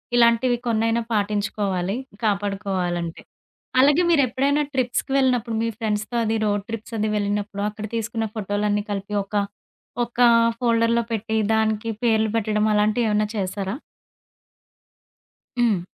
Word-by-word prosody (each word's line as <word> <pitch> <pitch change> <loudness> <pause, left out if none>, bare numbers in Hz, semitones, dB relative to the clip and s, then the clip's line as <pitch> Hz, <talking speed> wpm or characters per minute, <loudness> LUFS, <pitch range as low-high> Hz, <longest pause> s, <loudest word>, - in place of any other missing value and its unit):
ఇలాంటివి 240 +1 +4
కొన్నైనా 225 0 +1
పాటించుకోవాలి 205 -2 -1 0.3
కాపాడుకోవాలంటే. 195 -5 -1 0.6
అలాగే 290 +5 +5
మీరెప్పుడైనా 280 0 +2
ట్రిప్‌కి 250 0 -1
వెళ్ళినప్పుడు 245 -3 +1
మీ 230 - 0
ఫ్రెండ్స్‌తో 215 +1 -2
అది 220 +1 0
రోడ్ 205 -1 0
ట్రిప్స్ 225 +1 -6
అది 215 - 0
వెళ్ళినప్పుడు 205 0 -2
అక్కడ 215 0 -6
తీసుకున్న 225 0 -2
ఫోటోలన్నీ 205 0 -1
కలిపి 200 0 -4
ఒక 200 - -14 0.7
ఒక 235 +1 -16 0.4
ఫోల్డర్‌లో 230 -1 +2
పెట్టి 220 0 -2 0.2
దానికి 220 0 0
పేర్లు 220 -2 +3
పెట్టడం 215 -1 +1
అలాంటివేమన్నా 210 0 +2
చేశారా? 195 +1 -2 1.9
హ్మ్. 220 -7 +3
215 Hz, 110 wpm, -23 LUFS, 205-235 Hz, 1.9 s, అలాగే